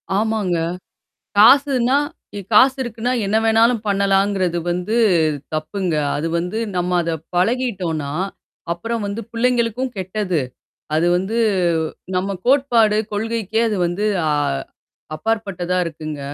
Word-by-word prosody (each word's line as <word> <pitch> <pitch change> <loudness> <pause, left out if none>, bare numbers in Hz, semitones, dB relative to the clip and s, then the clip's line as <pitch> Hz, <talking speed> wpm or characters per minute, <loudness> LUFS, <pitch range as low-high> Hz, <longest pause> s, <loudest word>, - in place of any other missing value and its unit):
ஆமாங்க. 210 -5 0 0.8
காசுனா 265 +2 +5 0.4
இ - - -3
காசு 260 +5 +6
இருக்குனா 240 +1 -3
என்ன 210 +3 +1
வேணாலும் 225 0 +3
பண்ணலாங்கிறது 195 -2 +1
வந்து 180 +6 -2 0.6
தப்புங்க. 170 +3 -2 0.2
அது 160 +3 -2
வந்து 180 +6 -3 0.2
நம்ம 180 0 -1
அத 165 0 -2 0.2
பழகிட்டோன்னா, 180 - 0 0.6
அப்புறம் 230 +6 -3
வந்து 205 +3 -4
புள்ளைங்களுக்கும் 245 +1 0
கெட்டது. 185 -2 -1 0.6
அது 165 +2 +2
வந்து 200 +6 -2 0.8
நம்ம 195 +2 -1
கோட்பாடு 240 -6 +4
கொள்கைக்கே 220 0 -1
அது 210 - -1
வந்து 180 +5 -2 0.2
அ - - +2 0.9
அப்பாற்பட்டதா 190 -3 -2
இருக்குங்க. 155 -2 -6
205 Hz, 105 wpm, -20 LUFS, 180-230 Hz, 0.9 s, காசு